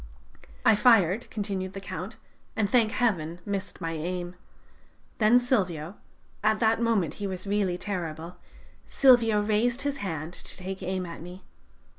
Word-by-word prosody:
"I 220 - +7
fired," 210 -3 +4
continued 195 -3 -3
the 195 - -5
Count, 195 0 -7 0.4
"and, 215 -2 +1
thank 225 -1 +3
Heaven, 175 -10 0
missed 200 -2 -4
my 165 - -3
aim. 175 +2 -4 0.9
Then 220 +2 +6
Silvio... 185 - -1 0.5
at 215 0 +3
that 225 0 +2
moment 220 -9 +1
he 200 - -1
was 185 0 -5
really 200 -3 0
terrible... 175 -3 -5 0.5
Silvio 230 -6 +5
raised 235 +5 +1
his 285 -1 -1
hand 165 - -4
to - - -6
take 190 +1 -6
aim 185 0 -2
at 170 -2 -8
me. 180 +2 -10
195 Hz, 145 wpm, -27 LUFS, 180-220 Hz, 0.9 s, I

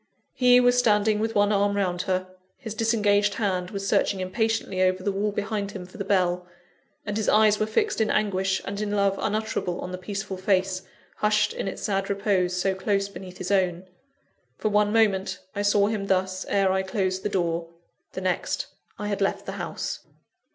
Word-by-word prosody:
He 250 -1 +6
was 245 0 +4
standing 210 -2 +3
with 225 +1 -1
one 205 0 +4
arm 200 0 +2
round 180 -3 0
her, 185 0 +1 0.3
his 225 -6 -6
disengaged 210 -2 +2
hand 185 -4 -1
was 195 0 -4
searching 195 - +2
impatiently 195 0 -1
over 185 0 +2
the 200 - +1
wall 205 +2 -1
behind 205 0 -3
him 180 - -7
for 180 - -14
the - - -1
bell, 180 -2 +1 0.6
and 205 - -3
his 220 -1 0
eyes 215 -1 +5
were 215 - +1
fixed 405 - 0
in 215 - +2
anguish 190 -2 0
and 200 +1 -4
in 210 - -2
love 200 -1 +2
unutterable 215 -4 -1
on 180 - -5
the 185 - -5
peaceful 195 0 -5
face, 190 0 +1 0.4
hushed 215 0 +2
in - - -4
its 195 - -5
sad 195 -1 -1
repose 195 -3 +1
so 190 +2 +1
close 195 +1 0
beneath 185 -2 -10
his 185 - -4
own. 185 -2 +1 0.7
For 215 - 0
one 210 0 +3
moment, 195 -4 +2 0.2
I 205 - -1
saw 205 0 +3
him 205 -2 -2
thus, 190 0 0
ere 195 -1 +3
I 190 0 +1
closed 190 -1 -1
the 210 - -2
door 170 -3 -1 0.5
the 190 - -4
next, 185 -1 -1 0.3
I 210 - -5
had 205 -1 -2
left 195 - 0
the - - -4
house. - - -4
200 Hz, 195 wpm, -25 LUFS, 185-210 Hz, 0.7 s, He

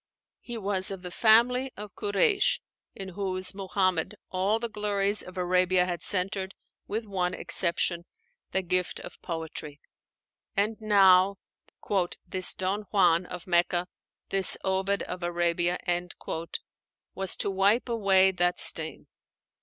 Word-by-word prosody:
He 240 -2 -7
was 195 -3 0
of 190 -2 -6
the 180 - -6
family 245 +6 +4
of 205 -2 -8
Kureísh, 400 - +2 0.4
in 195 -1 -7
whose 185 -1 -3
Muhammad 190 -1 -1 0.2
all 190 +4 +1
the 235 +1 -3
glories 205 -1 -1
of 185 0 -11
Arabia 180 0 +2
had 175 -2 -4
centred, 190 +2 -1 0.3
with 220 +2 -3
one 185 -3 -1
exception, 170 0 +1 0.5
the 190 - 0
gift 180 0 0
of - - -11
poetry. 160 -3 -6 0.8
And 210 +3 +2
now 195 -2 +5 0.9
"this 185 +1 0
Don 195 +2 -2
Juan 180 -3 +3
of 180 -1 -8
Mecca, 175 0 +2 0.5
this 195 -1 +1
Ovid 190 +1 0
of 180 - -6
Arabia," 175 0 0 1.4
was 190 -1 +3
to 200 - -1
wipe 200 +6 +3
away 195 -5 +4
that 175 -1 0
stain. - - -1
190 Hz, 125 wpm, -28 LUFS, 180-205 Hz, 1.4 s, now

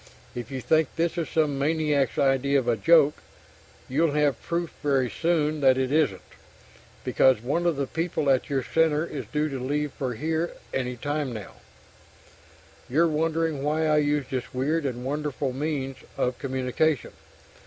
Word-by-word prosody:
If 120 0 -6
you 135 -2 -4
think 160 +3 +3
this 170 +1 0
is 170 -3 -2
some 150 -4 +1
maniac's 150 -3 +1
idea 140 0 +3
of 130 -3 -1
a 120 - +3
joke, 155 +2 +4 0.7
you'll 150 +3 +1
have 145 -4 +1
proof 170 0 -3
very 135 -4 +1
soon 155 -3 0
that 130 -1 +5
it 130 0 0
isn't, 150 -11 +1 0.8
because 130 -3 +4
one 170 +7 0
of 170 - +2
the 140 0 -1
people 165 0 -2
at 130 +2 +1
your 135 -2 0
Center 160 +1 +2
is - - -6
due 150 0 +1
to 135 -2 -4
leave 145 +3 -1
for 125 -3 -3
here 160 +5 -1 0.2
any 125 -1 -2
time 145 +1 -2
now. 105 -4 -8 1.4
You're 160 +7 +3
wondering 160 -1 0
why 155 +2 0
I 155 -1 +3
used 145 -2 0
this 130 -1 -4
weird 145 +4 0
and 125 -1 -5
wonderful 145 -1 -2
means 135 -1 -3 0.2
of 125 0 -1
communication. 130 +2 0
145 Hz, 165 wpm, -26 LUFS, 130-155 Hz, 1.4 s, that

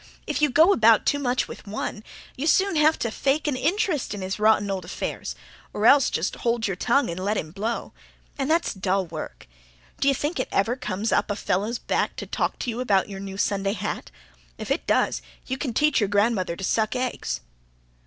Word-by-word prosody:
If - - -2
you 300 - +4
go 320 +9 +6
about 225 - +5
too 285 - +2
much 250 -2 0
with - - -10
one, 215 +1 -4 0.3
you 285 +4 -2
soon 385 +2 +3
have 310 +1 +4
to 230 - -2
fake 280 +6 0
an 290 - +1
interest 305 - 0
in 195 - -5
his 190 +2 -3
rotten 210 -2 +3
old 190 -2 -3
affairs. 170 - -5 0.4
Or 210 - -1
else 275 +2 +6
just 160 - -2
hold 235 -1 0
your 195 - -1
tongue 275 +8 +2
and 180 +2 -5
let 205 +2 0
him 155 - -4
blow. 220 +6 -3 0.4
And 275 0 -2
that's 330 +2 +2
dull 190 -1 0
work. 160 - -8 0.5
D'you 275 0 +3
think 295 +3 -2
it - - -2
ever 225 +5 +1
comes 225 -4 -3
up - - +2
a 205 - 0
fellow's 205 +4 -1
back - - -1
to - - -5
talk - - -2
to - - -2
you 230 - -5
about 205 -6 +2
your 195 -1 -6
new 195 0 -7
Sunday 195 -1 0
hat! - - -4 0.5
If - - -6
it - - -1
does, 60 - +2 0.2
you 260 - -2
can 270 - -2
teach 300 +5 +3
your 205 -3 +1
grandmother 205 -4 +1
to 190 - -8
suck 215 +4 +1
eggs." 255 0 -2
225 Hz, 210 wpm, -25 LUFS, 195-275 Hz, 0.5 s, go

